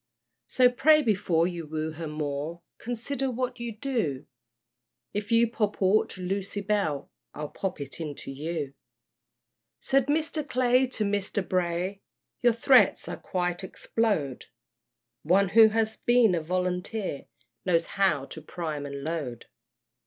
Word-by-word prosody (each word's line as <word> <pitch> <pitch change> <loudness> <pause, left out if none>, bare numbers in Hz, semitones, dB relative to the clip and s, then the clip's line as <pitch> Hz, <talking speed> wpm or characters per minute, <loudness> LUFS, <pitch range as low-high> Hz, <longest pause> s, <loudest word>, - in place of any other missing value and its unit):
So 255 -1 +5
pray 300 +5 +5
before 185 -7 +2
you 170 -3 -4
woo 155 +1 -3
her 160 +1 -6
more, 150 +2 -4 0.2
Consider 260 +3 -2
what 250 0 -3
you 235 0 -4
do; 215 - -2 0.9
If 205 +1 -3
you 230 +1 +5
pop 215 -2 -1
aught 195 +3 +3
to 185 - -8
Lucy 195 +2 -2
Bell 200 -9 -1 0.2
I'll 150 0 -5
pop 190 -4 -4
it 140 +3 -6
into 145 -3 -6
you. 150 0 -4 1.1
Said 270 -1 +2
Mr. 310 +1 0
Clay 255 +1 +3
to 235 -4 -2
Mr. 200 -1 -1
Bray, 180 +2 -1 0.4
Your 240 -1 +5
threats 250 +3 +4
I - - -4
quite 180 -1 -2
explode; 190 - -1 0.8
One 185 +4 +3
who 220 +2 +8
has 220 0 0
been 240 -5 +4
a 170 - 0
volunteer 180 +1 -2 0.4
Knows 170 -2 +2
how 190 -9 +1
to 160 - -9
prime 155 -2 -4
and 140 0 -6
load. 150 -7 -4
190 Hz, 140 wpm, -27 LUFS, 160-230 Hz, 1.1 s, who